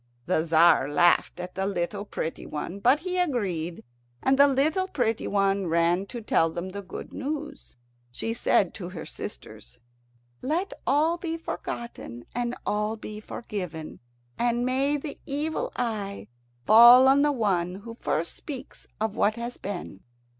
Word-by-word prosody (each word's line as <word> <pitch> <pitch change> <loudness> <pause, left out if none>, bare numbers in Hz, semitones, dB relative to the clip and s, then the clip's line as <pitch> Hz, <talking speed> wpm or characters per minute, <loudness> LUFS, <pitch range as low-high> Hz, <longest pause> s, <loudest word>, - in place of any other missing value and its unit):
The - - +2
Tzar 160 -3 +4
laughed 175 +4 +3
at 180 0 -6
the 190 +1 -1
little 200 +1 -2
pretty 165 -5 -5
one, 175 +6 -5
but 255 +8 +4
he 365 +1 -2
agreed, 190 - -1 0.4
and 265 - +4
the 280 +1 +7
little 300 +7 +2
pretty 240 - -1
one 195 -1 +1
ran 170 +3 +2
to 240 +1 -7
tell 165 -5 +3
them 175 +3 -5
the 200 +2 -6
good 190 - -9
news. 295 +2 -5 0.3
She 225 - -3
said 200 -5 +2
to 180 -4 -7
her 175 -4 -7
sisters, - - -9 0.6
"Let 335 +8 -1
all 315 +5 +3
be 330 -2 -3
forgotten, 235 - -6
and 245 0 -2
all 210 +1 -1
be 215 -1 -7
forgiven, 180 -8 -6 0.4
and 240 0 +1
may 270 +3 +1
the 290 0 -7
evil 315 - -2
eye 205 - -3 0.4
fall 240 +4 +9
on 275 +1 +5
the 295 0 +3
one 185 -8 0
who 225 +4 -9
first 165 +2 -1
speaks 275 -5 -9
of 220 -1 -1
what 215 +1 +2
has 235 +1 -5
been!" 185 - -6
215 Hz, 155 wpm, -26 LUFS, 180-270 Hz, 0.6 s, fall